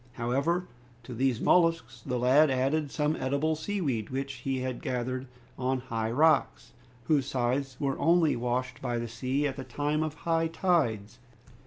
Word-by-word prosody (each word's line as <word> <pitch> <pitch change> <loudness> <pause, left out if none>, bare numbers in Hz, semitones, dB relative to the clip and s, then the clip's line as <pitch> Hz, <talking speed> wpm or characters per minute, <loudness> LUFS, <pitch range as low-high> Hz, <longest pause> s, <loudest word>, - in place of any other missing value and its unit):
However, 140 +9 0 0.4
to 125 - -8
these 125 0 +1
molluscs, 165 -9 +2
the 125 -2 -2
lad 135 +5 +5
added 135 +3 0
some 150 +2 0
edible 140 +4 0
sea 200 +6 -3
weed, 120 - -1
which 135 +1 -4
he 135 -1 -2
gathered 130 +2 -3 0.3
on 130 0 0
high 115 -3 -3
rocks, 155 +7 +2 0.3
whose 140 -1 +1
sides 130 0 -1
were 135 -2 -1
only 165 -1 +3
washed 125 +1 -2
by 120 -2 -2
the 120 0 -3
sea 130 +5 -1
at 135 -2 -2
the 135 - -5
time 145 +4 -1
of 155 -1 -2
high 165 +1 0
tides. 130 - 0
135 Hz, 160 wpm, -29 LUFS, 125-155 Hz, 0.4 s, lad